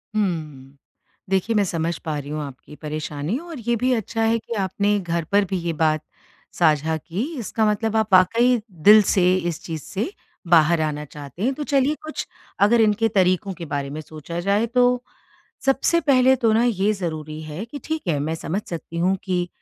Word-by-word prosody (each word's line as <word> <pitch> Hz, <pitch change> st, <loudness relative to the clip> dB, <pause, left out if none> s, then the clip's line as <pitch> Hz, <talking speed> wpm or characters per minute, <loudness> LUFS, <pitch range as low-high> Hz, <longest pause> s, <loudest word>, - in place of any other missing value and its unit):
हुँ। 155 Hz, -9 st, -3 dB, 0.5 s
देखिए 195 Hz, +4 st, +1 dB
मैं 205 Hz, -, +4 dB
समझ 165 Hz, -2 st, -2 dB
पा 155 Hz, -2 st, -2 dB
रही 145 Hz, 0 st, -6 dB
हूँ 150 Hz, +1 st, -3 dB
आपकी 140 Hz, +1 st, -10 dB
परेशानी 150 Hz, -, -4 dB
और 335 Hz, -3 st, -9 dB
ये 240 Hz, -, +3 dB
भी 250 Hz, +3 st, +1 dB
अच्छा 225 Hz, 0 st, -2 dB
है 225 Hz, +1 st, +3 dB
कि 225 Hz, -, -7 dB
आपने 200 Hz, +2 st, +1 dB
घर 170 Hz, -2 st, -2 dB
पर 200 Hz, 0 st, +4 dB
भी 190 Hz, 0 st, -2 dB
ये 170 Hz, -1 st, -2 dB
बात 155 Hz, -1 st, +1 dB, 0.5 s
साझा 160 Hz, -1 st, +2 dB
की, 175 Hz, +8 st, -4 dB, 0.2 s
इसका 220 Hz, 0 st, -1 dB
मतलब 220 Hz, +1 st, -1 dB
आप 220 Hz, -2 st, 0 dB
वाक़ई 230 Hz, +6 st, +5 dB, 0.2 s
दिल 210 Hz, +5 st, +8 dB
से 185 Hz, -1 st, +4 dB
इस 175 Hz, -3 st, -3 dB
चीज़ 160 Hz, -2 st, -5 dB
से 215 Hz, -, -3 dB, 0.4 s
बाहर 165 Hz, -1 st, +5 dB
आना 150 Hz, -1 st, -2 dB
चाहते 145 Hz, +4 st, -9 dB
हैं। 260 Hz, +4 st, +2 dB
तो 295 Hz, -, -5 dB
चलिए 280 Hz, +1 st, +2 dB
कुछ 310 Hz, 0 st, -5 dB, 0.3 s
अगर 225 Hz, +3 st, +5 dB
इनके 220 Hz, +1 st, +3 dB
तरीकों 190 Hz, -1 st, +1 dB
के 175 Hz, -2 st, -8 dB
बारे 140 Hz, -2 st, -3 dB
में 150 Hz, +2 st, -6 dB
सोचा 155 Hz, +2 st, -7 dB
जाए 200 Hz, +5 st, +1 dB
तो, 245 Hz, +1 st, +2 dB, 0.6 s
सबसे 270 Hz, +5 st, +2 dB
पहले 265 Hz, -4 st, +4 dB
तो 230 Hz, -3 st, +2 dB
ना 225 Hz, +2 st, +3 dB
ये 210 Hz, -3 st, +2 dB
ज़रूरी 155 Hz, -5 st, -5 dB
है 155 Hz, +6 st, -6 dB
कि 250 Hz, +5 st, -8 dB
ठीक 315 Hz, -1 st, -3 dB
है 155 Hz, -4 st, +1 dB
मैं 155 Hz, +3 st, -2 dB
समझ 170 Hz, +4 st, -3 dB
सकती 170 Hz, 0 st, -6 dB
हूँ 185 Hz, +3 st, +2 dB
कि 180 Hz, -2 st, -1 dB
185 Hz, 195 wpm, -22 LUFS, 155-225 Hz, 0.6 s, दिल